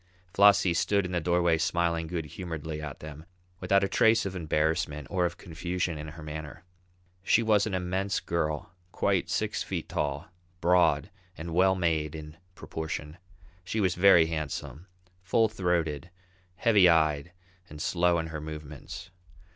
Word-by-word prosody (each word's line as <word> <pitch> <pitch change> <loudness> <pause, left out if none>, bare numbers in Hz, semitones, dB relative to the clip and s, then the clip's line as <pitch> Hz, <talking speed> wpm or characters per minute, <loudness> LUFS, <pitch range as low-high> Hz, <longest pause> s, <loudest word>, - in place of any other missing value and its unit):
Flossie 100 -3 +5
stood 100 +3 +1
in 90 - -5
the 90 -1 0
doorway 85 0 +2
smiling 85 0 0
good 80 -1 -3
humouredly 80 -1 -6
at 75 -3 -7
them, 75 0 -9 0.4
without 100 +2 +2
a - - +2
trace 110 +2 +3
of 95 -1 -4
embarrassment 75 -3 -1
or 90 -3 +2
of 85 - -9
confusion 90 -1 -3
in 75 - -6
her 75 +1 -10
manner. 75 +1 -7 0.6
She 115 +4 +3
was 105 -2 +3
an 100 - -2
immense 95 +1 -1
girl, 80 -1 -2 0.2
quite - - 0
six - - -1
feet - - -4
tall, 75 +3 -3 0.3
broad 85 -1 +3 0.3
and 80 +1 -6
well 95 +2 +4
made, 80 -4 0
in 75 0 -9 0.2
proportion. 80 0 -6 0.4
She 110 +5 -3
was 95 -3 +2
very 90 -3 +6
handsome, 80 +1 -5 0.3
full 110 +5 +2
throated, 90 -6 -1 0.5
heavy 100 -4 +5
eyed, 80 -1 +2 0.4
and 75 - -10
slow 90 +2 +2
in 80 - -2
her 80 -1 -5
movements. 75 +3 -8
85 Hz, 150 wpm, -28 LUFS, 75-90 Hz, 0.6 s, very